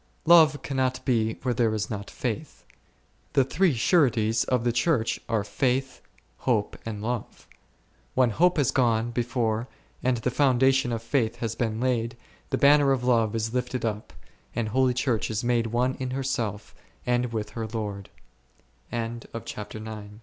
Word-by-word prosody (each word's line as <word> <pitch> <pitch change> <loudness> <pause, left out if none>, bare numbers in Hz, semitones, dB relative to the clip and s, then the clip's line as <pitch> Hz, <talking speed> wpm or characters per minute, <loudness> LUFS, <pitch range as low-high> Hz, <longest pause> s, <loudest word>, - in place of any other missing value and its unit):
Love 160 -3 +7
cannot 130 -2 0
be 110 -4 +1
where 125 -2 +1
there 115 -2 +1
is 105 - -2
not 100 -2 -5
faith; - - -5 0.7
the 135 - +5
three 165 +3 +2
sureties 115 - +3
of 125 -2 +1
the 120 - +2
Church 120 -1 +1
are 110 -3 +1
faith, 130 +3 -1 0.4
hope, 110 -5 0
and 105 -2 -5
love; 120 0 -4 0.7
when 125 -2 +4
hope 180 - +3
has 140 -5 +2
gone 120 -2 +2
before 120 -1 -1 0.3
and 125 -1 +1
the 120 +2 -1
foundation 130 -1 +3
of 115 -1 -3
faith 115 -2 0
has 115 -2 -3
been 115 -2 -2
laid, 120 -1 0 0.3
the - - 0
banner 140 0 +5
of 130 -2 0
love 115 -3 +2
is 110 0 -2
lifted 125 -1 -2
up, 105 -1 -3 0.4
and 115 -2 -1
holy 130 +2 +2
Church 120 -3 0
is 110 +2 -2
made 120 -1 +1
one 125 +3 +1
in 130 -1 -3
herself 125 -6 -3 0.3
and 125 -1 +1
with 105 -2 -3 1.4
he 110 -2 -6
120 Hz, 150 wpm, -26 LUFS, 110-130 Hz, 1.4 s, Love